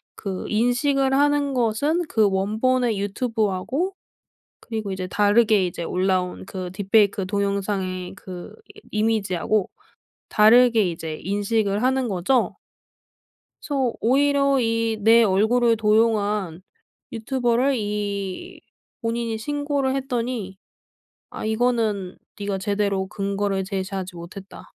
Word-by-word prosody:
그 195 -3 -5
인식을 265 +4 +1
하는 285 0 +2
것은 260 +8 +1
그 215 -3 +3
원본의 220 +4 +1
유튜브하고 220 - -1 0.7
그리고 220 -4 -5
이제 185 -1 -4
다르게 205 0 +3
이제 170 -1 -5
올라온 185 0 -1
그 185 -2 -6
딥페이크 200 0 +2
동영상의 195 -2 -2
그 185 +3 -9 0.2
이 - - -14
이미지하고 215 -2 0 0.6
다르게 225 -2 +5
이제 160 -2 -6
인식을 205 +1 0
하는 260 -1 +1
거죠. 200 +7 +1 1.1
그래서 265 -5 -1
오히려 275 +2 +3
이 230 -1 0
내 230 +2 +6
얼굴을 225 +4 +3
도용한 210 -5 +1 0.5
유튜버를 245 +3 0
이 205 - -4 0.4
본인이 230 -1 -2
신고를 285 +1 -1
했더니 240 -7 -3 0.7
아 - - -7
이거는 220 -4 0 0.2
네가 200 -1 -2
제대로 200 -1 -1
근거를 200 -1 -2
제시하지 190 -1 -4
못했다. 185 +3 -10
215 Hz, 255 characters per minute, -23 LUFS, 195-245 Hz, 1.1 s, 내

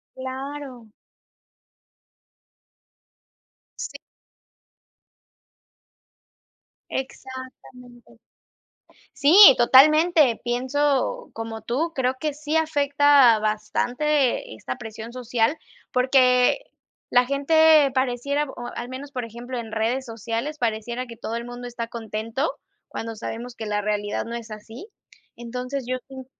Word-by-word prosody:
Claro. 260 -2 -7 2.9
Sí. - - -6 2.9
Exactamente. 260 -2 -9 0.9
Sí, 290 +4 +3 0.2
totalmente, 300 +2 +5
pienso, 275 - 0
como 225 0 -6
tú, 295 +9 -2
creo 255 -1 0
que 305 -2 -2
sí 300 +1 -3
afecta 285 -5 +4
bastante 245 - 0
esta 130 +4 -6
presión 225 +1 -9
social, 245 +3 0 0.3
porque 255 - +4 0.5
la 245 0 +4
gente 300 +1 +4
pareciera, 265 +3 0
o 240 -3 -8
al 240 - -5
menos, 270 +2 -8
por 250 -2 -4
ejemplo, 240 +2 -7
en 225 -2 -7
redes 235 +4 -1
sociales, 230 +6 -4
pareciera 235 +2 -2
que 230 -1 -11
todo 225 - -5
el 235 - -4
mundo 245 0 -8
está 235 -1 -5
contento, 230 +5 -3 0.4
cuando 225 -1 -6
sabemos 235 +2 -6
que 220 - -6
la 210 0 -1
realidad 205 0 -2
no 235 +1 -5
es 230 -1 -9
así. 225 - -10 0.5
Entonces, 250 +3 -5
yo 255 +1 -1
sien 265 -1 -10
250 Hz, 105 wpm, -23 LUFS, 230-280 Hz, 2.9 s, totalmente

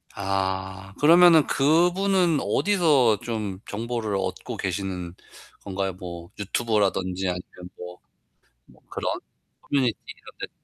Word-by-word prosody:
아 95 0 -3
그러면은 165 0 +7
그분은 175 +3 +3
어디서 150 - +3
좀 110 -6 -4
정보를 115 -1 -3
얻고 95 -1 -4
계시는 90 -2 -3 0.5
건가요? 95 -1 -3
뭐 85 -1 -9
유튜브라든지 95 -3 0
아니면 90 0 -7
뭐 90 0 -9 0.9
그런 - - -2 0.5
커뮤니티 130 -5 0 0.2
이런 - - -15
데 - - -6
100 Hz, 245 characters per minute, -25 LUFS, 95-140 Hz, 0.9 s, 그러면은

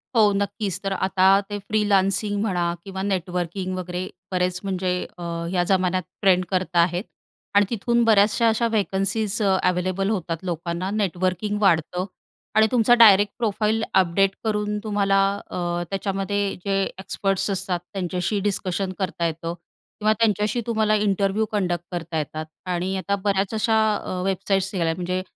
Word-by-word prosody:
हो. 215 -3 +5
नक्कीच. 200 -2 -2
तर 195 - -2 0.2
आता 190 -1 +2 0.2
ते 205 - -3
फ्रीलानसिंग 205 0 +1
म्हणा 185 -5 0 0.2
किंवा 190 -1 -5
नेटवर्किंग 185 -1 -2
वगैरे 180 0 -4 0.2
बरेच 180 0 0
म्हणजे 185 -2 -1 0.3
अ, 175 - -8 0.3
या 180 -1 +2
जमान्यात 185 -1 +2 0.2
ट्रेंड 185 -2 +4
करता 180 -2 0
आहेत. 175 +2 +2 0.5
आणि 205 0 +6
तिथून 235 +1 +1
बऱ्याचशा 220 +1 +4
अशा 225 +1 +2
व्हेकन्सीज 205 +1 0
अवेलेबल 185 0 +1
होतात 175 -6 -2
लोकांना, 170 +1 -3
नेटवर्किंग 190 0 -1
वाढतं 180 -1 +2 0.5
आणि 220 0 +6
तुमचा 240 -1 +4
डायरेक्ट 205 -2 +7
प्रोफाइल 220 -1 0
अपडेट 190 +1 +3
करून 210 -1 -1
तुम्हाला 200 -2 +2 0.3
अ, - - -5 0.3
त्याच्यामध्ये 195 0 -1
जे 195 0 +1 0.2
एक्सपर्ट्स 195 +1 -1
असतात, 190 -2 -1
त्यांच्याशी 180 +1 -1
डिस्कशन 190 0 -2
करता 185 -3 -1
येतं 165 +1 -4 0.5
किंवा 215 +1 +3
त्यांच्याशी 215 +1 +1
तुम्हाला 220 -2 +2
इंटरव्ह्यू 205 0 +1
कंडक्ट 175 -4 -1
करता 170 -2 -4
येतात. 155 +1 -3 0.2
आणि 180 +1 -1
आता 200 +2 -1
बऱ्याच 195 0 0
अशा 220 0 +2 0.2
अ, 185 -2 -4
वेबसाईट्स 195 0 0
निघाल्या 165 -3 0
म्हणजे 180 +1 -2
195 Hz, 140 wpm, -23 LUFS, 180-210 Hz, 0.5 s, डायरेक्ट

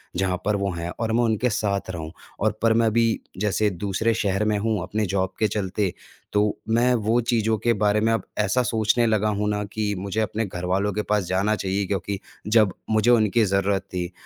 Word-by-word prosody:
जहाँ 90 0 0
पर 105 0 +2
वो 100 -1 -1
हैं 85 0 -4
और 115 -1 -1
मैं 120 +1 +3
उनके 115 +2 +1
साथ 100 -2 -1
रहूँ। 80 -2 -6 0.3
और 110 0 +2
पर 115 -1 +4
मैं 115 -1 +3
भी 115 0 +3 0.3
जैसे 105 +1 +1
दूसरे 100 +5 -1
शहर 100 -1 0
में 105 -1 +1
हूँ 110 -3 0
अपने 105 +3 -1
जॉब 95 0 -1
के 110 - +3
चलते 100 -1 -1 0.4
तो 105 - +4 0.3
मैं 120 +2 +3
वो 115 +2 +1
चीज़ों 110 -1 +1
के 120 -1 +3
बारे 105 0 +2
में 115 - +2
अब 110 - -1 0.2
ऐसा 105 +5 +2
सोचने 110 +1 +2
लगा 110 -1 +2
हूँ 105 0 0
ना 105 0 -1
कि 105 -1 -1
मुझे 100 +3 -3
अपने 110 +1 -1
घरवालों 95 +2 -1
के 105 - -1
पास 105 -2 +2
जाना 95 +4 +1
चाहिए 95 0 -1
क्योंकि 100 0 -2 0.3
जब 105 -3 +4 0.2
मुझे 110 +2 +3
उनकी 115 -1 +4
ज़रूरत 95 0 +1
थी, 90 -1 -3
105 Hz, 205 wpm, -24 LUFS, 95-110 Hz, 0.4 s, पर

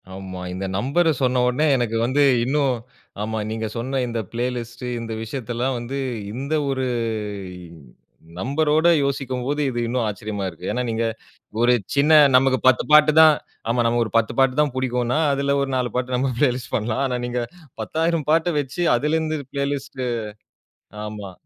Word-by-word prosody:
ஆமா. 95 -1 -7
இந்த 95 +1 -4
நம்பர் 140 +10 +2
சொன்னவுனே 125 +3 +2
எனக்கு 120 -2 -1
வந்து 135 +4 +2 0.2
இன்னும் 140 0 +1 0.5
ஆமா, 110 +1 -2
நீங்க 110 0 -3
சொன்ன 130 +3 -2
இந்த 115 -1 -3
பிளேலிஸ்ட் 120 0 -4 0.2
இந்த 115 -1 -5
விஷயத்தல்லாம் 120 +2 -3
வந்து 125 +4 -5 0.4
இந்த 135 +5 -4 0.2
ஒரு 130 -1 -1 1.5
நம்பரோட 150 - +2 0.2
யோசிக்கும்போது 135 +1 -2
இது 120 - -3
இன்னும் 120 0 0
ஆச்சரியமா 105 -1 -4
இருக்கு. 90 0 -6
ஏன்னா, 125 - -1
நீங்க 115 0 -1 0.6
ஒரு 120 +1 +5 0.2
சின்ன 145 +3 +3 0.2
நமக்கு 130 0 +3
10 130 -1 +5
பாட்டு 155 0 +7
தான், 155 -1 +8 0.5
நமக்கு 120 +1 +2
ஒரு 110 - -7
10 115 -1 +2
பாட்டு 135 -1 +4
தான் 150 -3 +2
பிடிக்குன்னா, 125 +1 0
அதில 140 0 +1
ஒரு 140 - -2
4 125 -1 0
பாட்டு 125 0 -1
நம்ம 130 +1 0
பிளேலிஸ்ட் 125 -3 0
பண்ணலாம். 110 +4 -1
ஆனா 125 -1 -1
நீங்க 120 0 -2 0.4
10,000 160 +4 -1
பாட்ட 165 +2 +3
வச்சு 145 +6 -3
அதிலிருந்து 155 +3 0
பிளேலிஸ்ட் 140 -1 -3 1.0
ஆமா. 105 -2 -7
125 Hz, 145 wpm, -22 LUFS, 115-140 Hz, 1.5 s, தான்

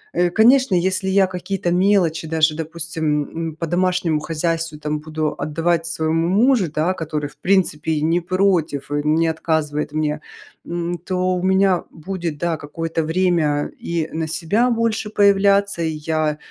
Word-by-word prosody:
Э, 175 0 +3
конечно, 235 +2 +4
если 190 +2 0
я 195 0 +4
какие-то 185 -1 -3
мелочи 180 -4 +2
даже, 155 -1 +2
допустим, 160 -2 -2 0.3
м, 155 - -10
по 165 - -3
домашнему 175 -2 +1
хозяйству 165 0 -2
там 150 0 -3
буду 155 0 -3
отдавать 165 +3 0
своему 165 0 0
мужу, 215 - +3
да, 160 +4 0
который 155 -4 -3
в - - -22
принципе 175 -5 +1
и 150 - -1
не 165 +2 +2
против, 175 -6 0
и 145 - 0
не 165 +2 +3
отказывает 155 -2 -1
мне, 155 0 -1 0.5
м, 175 0 -3
то 185 +1 -1
у 180 - -2
меня 190 -1 +3
будет, 170 -2 -5
да, 170 -1 -1
какое-то 165 +3 -3
время 160 -3 +1
и 165 -2 -2
на 160 0 -2
себя 200 +10 +1
больше 225 -2 0
появляться, 200 -2 +3
и 160 - 0 0.2
я, 155 -2 0
165 Hz, 155 wpm, -20 LUFS, 155-185 Hz, 0.5 s, конечно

